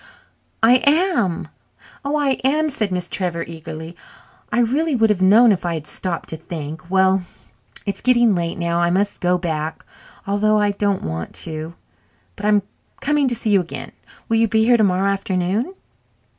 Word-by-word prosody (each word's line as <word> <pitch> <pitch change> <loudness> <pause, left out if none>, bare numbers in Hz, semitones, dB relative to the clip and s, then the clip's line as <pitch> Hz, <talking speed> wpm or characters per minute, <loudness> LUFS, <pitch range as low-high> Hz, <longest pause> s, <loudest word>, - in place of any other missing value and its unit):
"I 245 +2 +6
am. 295 - +2 0.6
Oh, 280 +2 -1
I 290 -2 +1
am!" 305 +3 +2
said 215 -6 -2
Miss 180 -1 -2
Trevor 175 -3 -2
eagerly. 160 0 -8 0.6
"I 215 - 0
really 280 +6 +1
would 225 -2 +3
have 190 -3 -1
known 215 +5 +6
if 195 - 0
I 170 -1 -1
had 155 -2 -6
stopped 170 +2 -3
to 160 - -5
think. 160 0 -7
Well, 190 0 +3 0.6
it's 200 -2 -3
getting 240 -3 +4
late 170 -2 -2
now. 170 0 0
I 175 0 +2
must 200 +3 0
go 180 0 +2
back, 160 -3 -4 0.4
although 210 +2 +2
I 205 -1 +2
don't 200 -1 -1
want 80 +1 -5
to. 160 +1 -6 0.6
But 205 - -3
I'm 210 -2 +3 0.4
coming 295 -1 +1
to 245 - 0
see 225 -1 -1
you 195 -2 +5
again. 170 - -8 0.4
Will 225 - +2
you 225 0 +3
be 220 +1 +2
here 240 +1 +5
tomorrow 195 -3 +2
afternoon?" 195 - -1
195 Hz, 170 wpm, -20 LUFS, 175-230 Hz, 0.6 s, I